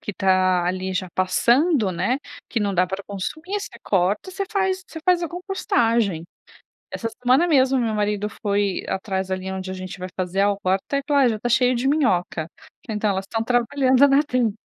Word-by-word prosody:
que 205 - -5
tá 185 -2 +2
ali 185 +1 -2
já 185 0 -2
passando, 235 - +2
né. 185 +9 0 0.3
Que 230 - -1
não 200 -1 0
dá 180 +1 +3
pra 190 +2 -5
consumir, 315 - -4
você 400 - -8
corta, 195 - 0
você 395 +2 -3
faz 380 -2 0
você 320 - -8
faz 360 -1 +3
a 340 - -2
compostagem. 235 - 0 0.7
Essa 230 - -3
semana 255 +8 +4
mesmo 265 -4 +3
meu 230 -3 0
marido 210 -1 -1
foi 200 -3 0
atrás 190 -1 -2
ali 190 0 -3
onde 190 0 -5
a 185 - -4
gente 185 0 -7
vai 185 - -5
fazer 185 +1 -1
a 205 - +4
horta 195 +6 -1
e - - -1
falou: 285 -2 +4
"Ah, - - +5
já 225 - -1
está 240 - -3
cheio 250 +1 +3
de 245 +3 -1
minhoca. 180 - +1 0.4
Então, 210 -1 0
elas 190 0 -3
estão 225 +2 -2
trabalhando 255 +3 +3
na 275 +1 +4
terra. 250 -6 +1
210 Hz, 195 wpm, -22 LUFS, 190-270 Hz, 0.7 s, Ah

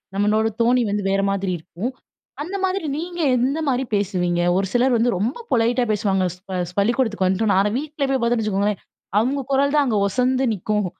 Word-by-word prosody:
நம்மளோட 210 +2 +2
தொனி 245 +2 +3
வந்து 205 0 -1
வேற 195 0 +2
மாதிரி 195 -1 -1
இருக்கும். 175 +8 -5 0.5
அந்த 355 +7 -5
மாதிரி 375 -2 -2
நீங்க 345 +2 -5 0.2
எந்த 265 +6 0
மாதிரி 260 -1 +1
பேசுவீங்க? 180 -3 0 0.2
ஒரு 195 0 0
சிலர் 250 +1 +3
வந்து 235 +1 +2
ரொம்ப 220 +9 -1
பொலைட்டா 240 +2 +2
பேசுவாங்க. 195 -2 +1
ஸ்ப 185 0 -6
ஸ் 180 - -16
பள்ளிக்கூடத்துக்கு 220 -2 +1
வந்துட்டோன்னா. 195 +1 +2
ஆனா 205 - +1
வீட்ல 300 0 -5
போய் 270 -1 +1
பார்த்தோன்னு 235 -1 +1
வச்சுக்கோங்களேன், 205 -1 0 0.4
அவுங்க 265 +5 0
குரல் 280 +1 +2
தான் 295 -1 +4
அங்க 215 -4 +1
ஒசந்து 255 +5 +1
நிக்கும் 210 +1 -1
225 Hz, 180 wpm, -21 LUFS, 195-260 Hz, 0.5 s, தான்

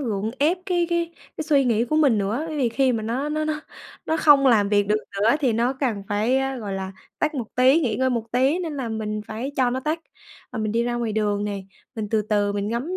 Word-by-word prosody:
gượng 220 -5 -2
ép 315 +6 +3
cái 350 -2 +1
cái 340 0 0 0.2
cái 315 - -3
suy 285 -3 +3
nghĩ 230 -1 +2
của 305 +6 -1
mình 280 -8 +4
nữa, 210 +9 -1
bởi 310 - -4
vì 260 -4 +2
khi 255 +2 +2
mà 225 - -2
nó 250 +7 -2
nó 310 +1 -1
nó 310 0 -2 0.5
nó 320 - +1
không 290 -3 +6
làm 215 -5 +4
việc 205 0 +3
được 210 - +3 0.2
nữa 210 - +3
á 260 - +4
thì 260 -5 +2
nó 235 +3 +1
cần 255 -7 -2
phải, 215 +6 +1
a, 270 0 -1
gọi 210 -4 -5
là, 190 0 -4 0.3
tắt 305 +1 0
một 250 -5 -3
tí, 260 +5 +5
nghỉ 235 -9 0
ngơi 260 +2 +1
một 230 -2 -3
tí, 265 +7 +2
nên 325 -5 -4
là 260 -4 -3
mình 215 -1 -3
phải 230 +6 -4
cho 255 -2 +3
nó 255 +1 -2
tắt. 310 +4 -2 0.5
Và 250 - -4
mình 215 -1 -1
đi 230 +1 +2
ra 240 0 -1
ngoài 235 -2 -2
đường 205 -1 0
này, 200 -2 -4 0.3
mình 220 -3 -4
từ 220 -1 +2
từ 205 -1 +1
mình 205 0 -2
ngắm 255 +11 -2
240 Hz, 265 wpm, -23 LUFS, 215-285 Hz, 0.5 s, không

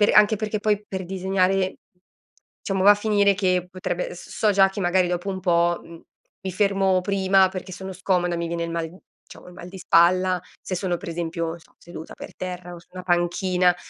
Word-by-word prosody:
Per 205 - +5
anche 210 +1 +6
perché 215 0 -3
poi 210 0 +1
per 190 -1 -4
disegnare 190 +1 0 0.8
diciamo 195 -1 -2
va 205 - +9
a - - +2
finire 205 -1 +2
che 185 -2 0
potrebbe 180 -1 -4
s - - -12
so 215 - +1
già 195 -1 +5
che 200 - -6
magari 180 0 +2
dopo 180 +2 -2
un 190 -1 -4
po', 175 -1 +2
uhm, 165 0 -13 0.4
mi 190 - -4
fermo 195 -1 +2
prima 190 -1 +3
perché 185 0 -7
sono 190 +1 -7
scomoda, 180 -1 0
mi 170 0 -2
viene 170 0 -2
il 170 - -5
mal 165 -1 -2
uhm, 180 - -15 0.3
diciamo - - -14
il - - -12
mal 175 0 -10
di 190 - -10
spalla, 180 +1 +3 0.2
se 185 - -4
sono 180 -1 -1
per 175 0 -7
esempio, 165 0 -3
non 165 +1 -6
so, - - -24
seduta 165 -2 -10
per - - -10
terra 180 -1 -6
o - - -10
su - - -23
una 185 - -7
panchina, 180 0 +2
185 Hz, 215 wpm, -24 LUFS, 175-195 Hz, 0.8 s, va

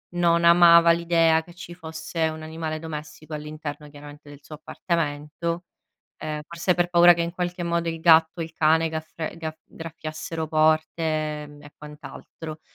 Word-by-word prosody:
non 170 -1 +2
amava 170 0 +7
l'idea 165 -1 +2
che 175 - -16
ci 175 0 -10
fosse 160 -1 -3
un 155 0 -7
animale 155 0 -5
domestico 155 -1 -8
all'interno, 150 0 -7
chiaramente, 145 0 -13
del 145 -1 -12
suo 155 - -10
appartamento. 165 +1 -3 0.6
Ehm, 150 -1 -4
forse 170 +2 -1
per 175 0 +1
paura 175 0 +7
che 170 - -1
in 170 0 -3
qualche 180 0 -3
modo 170 0 -1
il 165 0 -3
gatto 160 0 +4
o - - 0
il 160 - -12
cane 160 +1 +2
gafr 160 +1 -6
gafr 160 -1 -6
graffiassero 160 0 -6
porte 155 +1 +1
e, 155 -1 -2 0.2
ehm, - - -12
quant'altro. 150 +1 -10
160 Hz, 160 wpm, -24 LUFS, 155-170 Hz, 0.6 s, amava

